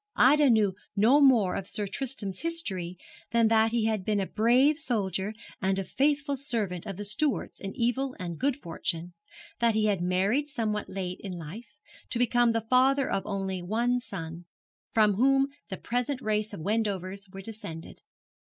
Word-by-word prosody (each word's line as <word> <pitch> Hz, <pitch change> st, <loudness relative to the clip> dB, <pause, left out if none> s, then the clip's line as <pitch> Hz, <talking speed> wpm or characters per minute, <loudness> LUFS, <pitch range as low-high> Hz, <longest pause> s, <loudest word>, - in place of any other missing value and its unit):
Ida 285 Hz, +2 st, +5 dB
knew 215 Hz, -4 st, +4 dB, 0.2 s
no 230 Hz, +8 st, +5 dB
more 235 Hz, -9 st, +5 dB
of 195 Hz, -, -4 dB
Sir 210 Hz, -, -2 dB
Tristram's 205 Hz, -4 st, -3 dB
history 190 Hz, -, -3 dB, 0.3 s
than 230 Hz, -1 st, +3 dB
that 225 Hz, 0 st, +4 dB
he 230 Hz, -1 st, 0 dB
had 215 Hz, -3 st, 0 dB
been 210 Hz, +1 st, 0 dB
a 195 Hz, -, 0 dB
brave 250 Hz, +9 st, +3 dB
soldier 210 Hz, -7 st, -1 dB, 0.3 s
and 190 Hz, 0 st, +1 dB
a 195 Hz, -, -1 dB
faithful 285 Hz, +5 st, 0 dB
servant 220 Hz, -, -2 dB
of 195 Hz, -3 st, -5 dB
the 205 Hz, -, -5 dB
Stuarts 250 Hz, +7 st, -1 dB
in 195 Hz, 0 st, -6 dB
evil 255 Hz, +3 st, 0 dB
and 170 Hz, -3 st, -5 dB
good 280 Hz, 0 st, +1 dB
fortune; 170 Hz, -5 st, -3 dB, 0.5 s
that 235 Hz, -2 st, +3 dB
he 215 Hz, 0 st, +2 dB
had 200 Hz, -4 st, +1 dB
married 195 Hz, +11 st, +1 dB
somewhat 220 Hz, -7 st, -2 dB
late 185 Hz, -1 st, -4 dB
in 195 Hz, -2 st, -6 dB
life, 205 Hz, +6 st, -9 dB, 0.3 s
to -, -, -1 dB
become 240 Hz, 0 st, +3 dB
the 230 Hz, 0 st, 0 dB
father 265 Hz, +2 st, +3 dB
of 195 Hz, -1 st, -1 dB
an -, -, -10 dB
only 200 Hz, +5 st, -1 dB
son, 170 Hz, -7 st, -6 dB, 0.5 s
from 215 Hz, -2 st, +4 dB
whom 270 Hz, +3 st, +4 dB, 0.2 s
the 190 Hz, -, -4 dB
present 250 Hz, +3 st, -2 dB
race 215 Hz, -1 st, -1 dB
of 200 Hz, -, -7 dB
Wendovers 200 Hz, -1 st, -2 dB
were 195 Hz, 0 st, -8 dB
descended. 190 Hz, -6 st, -9 dB
215 Hz, 170 wpm, -28 LUFS, 190-250 Hz, 0.5 s, Ida